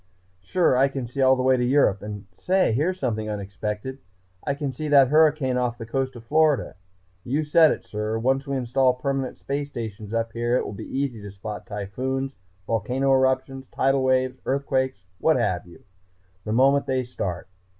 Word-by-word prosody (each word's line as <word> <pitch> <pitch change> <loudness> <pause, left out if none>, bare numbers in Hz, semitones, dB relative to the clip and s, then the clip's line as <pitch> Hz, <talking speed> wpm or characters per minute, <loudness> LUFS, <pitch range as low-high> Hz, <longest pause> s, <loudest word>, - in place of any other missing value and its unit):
Sure, 165 - +2
I 135 +2 +4
can 135 -2 -4
see 125 +3 -4
all 130 0 +6
the 130 - -1
way 130 0 +4
to 125 - 0
Europe 125 -6 +3
and 105 -1 -7
say! 185 - +2
Here's 175 +9 0
something 110 -4 -2
unexpected. 105 +5 -4 0.4
I 140 - -1
can 140 -2 -3
see 155 +4 -4
that 140 -3 +6
hurricane 150 -4 +3
off 120 -1 -1
the 115 - -7
coast 130 +3 -2
of 120 - -10
Florida.... 150 +2 +2 0.5
You 145 +5 -1
said 155 +1 +5
it, - - -3
sir! 105 +1 -3
Once 135 +4 0
we 140 -1 -1
install 130 +1 +2
permanent 135 0 -2
space 140 +1 -3
stations 110 -4 -6
up 115 0 -1
here 120 +1 +1
it - - -1
will - - -5
be 100 - -7
easy 130 -5 -3
to 100 - -8
spot 100 +2 -7
typhoons, 130 +7 -3 0.3
volcano 125 +6 0
eruptions, 130 0 +1
tidal 135 0 +2
waves, 130 0 +1
earthquakes, 130 -5 -1 0.2
what 160 - +3
have 95 -8 0
you, 85 - -16 0.6
the 105 - -3
moment 135 +4 +3
they 130 -1 0
start. 95 -8 -5
130 Hz, 185 wpm, -24 LUFS, 115-135 Hz, 0.6 s, all